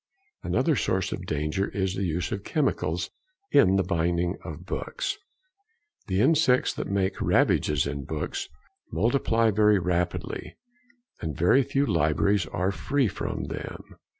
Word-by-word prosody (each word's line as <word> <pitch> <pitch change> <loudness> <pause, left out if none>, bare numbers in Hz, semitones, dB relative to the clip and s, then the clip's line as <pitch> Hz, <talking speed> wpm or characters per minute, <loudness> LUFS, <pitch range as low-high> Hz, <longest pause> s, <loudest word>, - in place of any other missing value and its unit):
Another 160 -3 +1
source 95 -6 0
of - - -5
danger 75 +6 -1
is 95 -2 -1
the 95 +1 -2
use 85 +3 -2
of 100 -2 -3
chemicals 90 - -1 0.4
in 95 +1 +5
the 95 - +3
binding 85 0 0
of 85 0 -8
books. 390 - -3 0.9
The 95 0 +1
insects 130 -2 +3
that - - -4
make 95 -1 0
ravages 75 -3 +2
in 70 -1 -4
books - - -4 0.4
multiply 115 - +2
very 105 0 +4
rapidly, 90 -1 -2 0.7
and 80 -2 -4
very 90 +11 +5
few 135 +2 0
libraries 85 - +2
are 95 +2 -1
free 135 +5 0
from - - -4
them. - - -7
95 Hz, 135 wpm, -26 LUFS, 85-110 Hz, 0.9 s, in